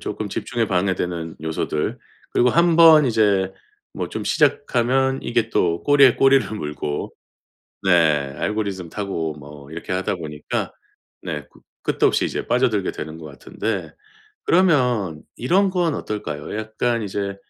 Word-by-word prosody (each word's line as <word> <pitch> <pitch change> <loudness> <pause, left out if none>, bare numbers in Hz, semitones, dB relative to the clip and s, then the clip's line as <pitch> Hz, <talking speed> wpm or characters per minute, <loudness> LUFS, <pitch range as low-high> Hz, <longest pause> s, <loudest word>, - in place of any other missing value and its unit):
쪼끔 - - -4
집중에 115 -2 -2
방해되는 90 -3 -1
요소들 80 -1 -2 0.3
그리고 125 +1 +3
한번 165 -2 +6
이제 100 -5 +2 0.4
뭐 - - -4
좀 - - -5
시작하면 130 +2 +1
이게 120 -1 0
또 85 -4 +1
꼬리에 140 -3 +6
꼬리를 135 0 +4
물고 75 -3 -4 0.7
네 95 - +2 0.5
알고리즘 100 -5 -3
타고 85 -6 -3
뭐 70 -1 -12
이렇게 85 +3 -7
하다 95 +1 -1
보니까 75 -3 -4 0.5
네 - - -5
끝 - - -21 0.2
끝도 - - +2
없이 - - +1
이제 - - -4
빠져들게 120 -6 +1
되는 80 +1 -7
것 80 - -10
같은데 75 +9 -5 0.5
그러면 125 - +2
이런 190 +10 +2
건 175 -4 0
어떨까요? 100 - -5
약간 110 +2 -1
이제 100 -1 -3
105 Hz, 290 characters per minute, -22 LUFS, 85-125 Hz, 0.7 s, 한번